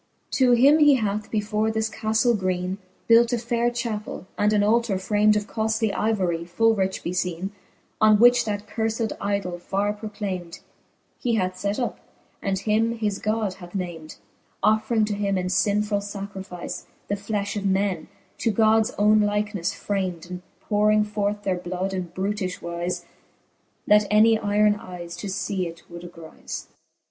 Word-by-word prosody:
To 255 -2 +4
him 275 +6 +6
he 295 -2 +7
hath, 210 -3 -2
before 215 0 0
this 220 0 0
caftle 220 +2 +1
greene, 185 -1 -2 0.3
Built 235 +1 +5
a - - +2
faire 235 +1 0
chappell, 230 -5 -4
and 210 0 +2
an 210 -1 +3
altar 220 -1 +2
framed 210 +2 +3
Of 210 -1 0
coftly 220 -1 -1
ivory, 185 -6 0
full 225 +7 +2
rich 190 -2 -1
befeene, 180 +1 -2 0.5
On 215 -1 +6
which 245 +2 +6
that 205 -1 -3
curfed 220 +1 -2
idole 200 -3 -2
farre 200 +3 -1
proclamed 205 -5 -6 0.6
He 240 -3 0
hath 185 -3 -2
(et 200 0 0
up, 245 - -2 0.4
and 195 -1 -1
him 225 +3 +1
his 210 -3 -1
God 215 -2 -1
hath 180 0 -12
named, 170 -4 -5 0.5
Offring 220 +1 +3
to 210 - -2
him 200 -1 0
in 180 - -1
linfuU 205 +1 0
lacrifice 190 -3 -7 0.2
The - - -1
flefh 205 0 -2
of 200 -1 -1
men, 190 -3 0 0.3
to 230 - +1
Gods 220 +1 +3
owne 210 +1 +5
likelinefle 210 -3 0
framed, 185 -5 -3
And 180 0 -5 0.2
po 210 -1 -1
wring 215 0 +5
forth 205 0 -2
their 185 -2 0
bloud 185 +2 -3
in 185 -2 -3
brutifhe 190 +1 -3
wize. 175 +1 -3 0.8
That 210 0 +5
any 220 +2 +6
yron 210 0 +2
eyes 175 -2 -8
to 205 - -5
fee 190 -1 -2
it 165 0 -10
would 170 0 -8
agrize. 165 -2 -8
205 Hz, 160 wpm, -24 LUFS, 185-220 Hz, 0.8 s, he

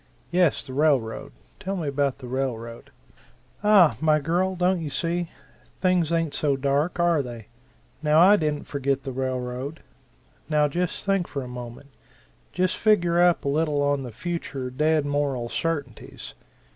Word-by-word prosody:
Yes, 175 -3 +2
the 130 - -8
railroad 135 -6 +1 0.3
tell 195 +1 -3
me 165 -5 -3
about 140 -1 0
the 130 -2 -10
railroad." 120 -3 -4 0.7
"Aha, 190 - +5
my 155 -1 +4
girl, 175 +5 0
don't 180 0 +1
you 155 - -4
see? 170 +3 -2 0.5
Things 180 -3 +2
ain't 165 -3 0
so 145 -2 +1
dark, 140 +6 0
are 170 -3 +3
they? 120 -4 -9 0.5
Now 150 0 +4
I 190 +4 +7
didn't 150 -5 -1
forget 140 -1 -2
the 135 - -5
railroad. 130 +3 -4 0.7
Now 150 -1 +3
just 175 +4 -2
think 195 -3 +1
for 140 -2 -5
a - - -8
moment 125 +2 -9 0.6
just 185 0 0
figure 175 -5 +3
up 175 -3 +3
a - - +1
little 150 -1 +1
on 145 -1 +1
the 125 -3 -7
future 135 -1 -5
dead 150 +3 +1
moral 140 -4 -1
certainties. 145 -7 -4
150 Hz, 155 wpm, -25 LUFS, 135-170 Hz, 0.7 s, I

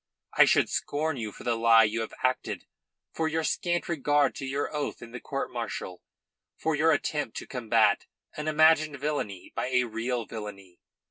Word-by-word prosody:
I - - +7
should - - +4
scorn 150 0 -1
you 110 -3 -4
for - - -12
the 120 -1 +1
lie 115 0 +6
you 110 +1 0
have 110 - -6
acted, - - -1 0.5
for 160 - 0
your 160 +1 -1
scant 175 +2 -1
regard 145 -3 +2
to 135 - -5
your 140 +3 -2
oath 150 - -3
in 115 - -11
the 125 - -6
court 135 +2 -4
martial, 115 -6 -5 0.6
for 160 - 0
your 155 +2 +3
attempt 150 -8 -1
to - - -5
combat 115 -3 +2 0.3
an 150 0 -5
imagined 155 -1 +4
villainy 135 -10 -3
by - - -1
a 125 -1 +2
real 120 +1 -2
villainy. 100 -5 -9
130 Hz, 180 wpm, -28 LUFS, 115-150 Hz, 0.6 s, I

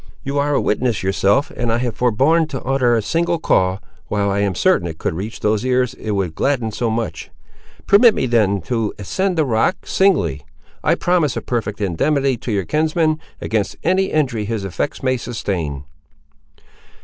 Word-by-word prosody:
You 140 +1 -1
are 145 0 +1
a - - +3
witness 115 -1 0
yourself 100 +7 +2
that 120 -1 -3
I 115 - +2
have 120 -3 -2
forborne 135 +8 +2
to 135 -4 -6
utter 130 -2 +2
a 115 - 0
single 170 +10 0
call, 95 - +1 0.3
while 100 -1 0
I 100 - 0
am 100 -2 0
certain 85 - +2
it 80 -1 -7
could - - -2
reach 100 +7 -6
those 105 +1 +1
ears 125 -1 +1
it 110 -4 -4
would 95 -5 -1
gladden 120 - 0
so 115 +2 -1
much. 115 0 -3 0.6
Permit 215 +2 +6
me - - 0
then 105 -5 +2
to 115 +2 -2
ascend 185 - -1
the 155 - +3
rock, 120 +9 0
singly; 90 - +2 0.4
I - - +3
promise 175 -6 +1
a - - -2
perfect 105 -4 -3
indemnity 135 - +1
to 120 +1 -5
your 100 -3 0
kinsman, 155 - +1 0.2
against 110 -2 -2
any 185 +3 +2
injury 130 - 0
his 110 -1 -3
effects 95 - -3
may 130 -1 +1
sustain." 90 - -4
120 Hz, 180 wpm, -19 LUFS, 100-145 Hz, 0.6 s, Permit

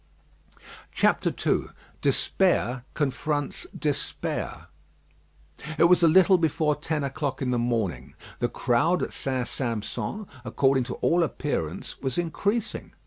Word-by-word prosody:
II - - +2 0.3
DESPAIR 130 -10 +1
CONFRONTS 145 +1 -2
DESPAIR 145 -2 -3 1.1
It - - +4
was 180 +1 +6
a 170 - +6
little 185 +3 +6
before 155 -2 +1
ten 150 0 -2
o'clock 140 0 -2
in 130 -2 -1
the 120 - +1
morning. 110 - -2 0.2
The - - +1
crowd 160 +9 +1
at - - -4
St. 130 -2 -2
Sampson, 125 - -3 0.2
according 130 +1 +2
to 120 - -5
all 175 +1 +2
appearance, 145 - -3
was 130 -3 -2
increasing. 200 +7 -2
145 Hz, 115 wpm, -26 LUFS, 125-170 Hz, 1.1 s, was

